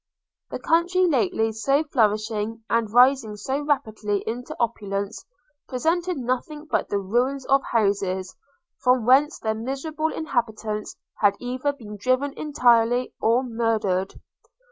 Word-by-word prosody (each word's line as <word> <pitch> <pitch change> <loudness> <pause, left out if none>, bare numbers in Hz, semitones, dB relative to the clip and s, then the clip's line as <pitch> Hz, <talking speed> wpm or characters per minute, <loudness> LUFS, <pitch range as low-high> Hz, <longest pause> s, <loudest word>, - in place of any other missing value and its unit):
The - - -4
country, 350 +3 +2
lately 225 - +1
so 275 +7 +1
flourishing, 220 -4 0
and 230 -2 +1
rising 245 -3 +4
so 265 +7 -2
rapidly 220 -8 -1
into 245 +3 -5
opulence, 200 -3 -2 0.4
presented 335 +7 0
nothing 260 +4 -3
but 310 - -1
the 205 - 0
ruins 245 +8 0
of 275 0 +3
houses, 195 -4 0 0.4
from 250 -2 +2
whence 275 +5 +4
their 220 -1 -1
miserable 275 +7 -3
inhabitants 220 -7 -3 0.2
had 205 -1 +4
either 255 +3 -2
been 215 -7 -10
driven 255 +6 0
entirely, 245 -4 +2
or 235 +3 +3
murdered! 220 -6 -1
240 Hz, 120 wpm, -24 LUFS, 215-275 Hz, 0.4 s, rising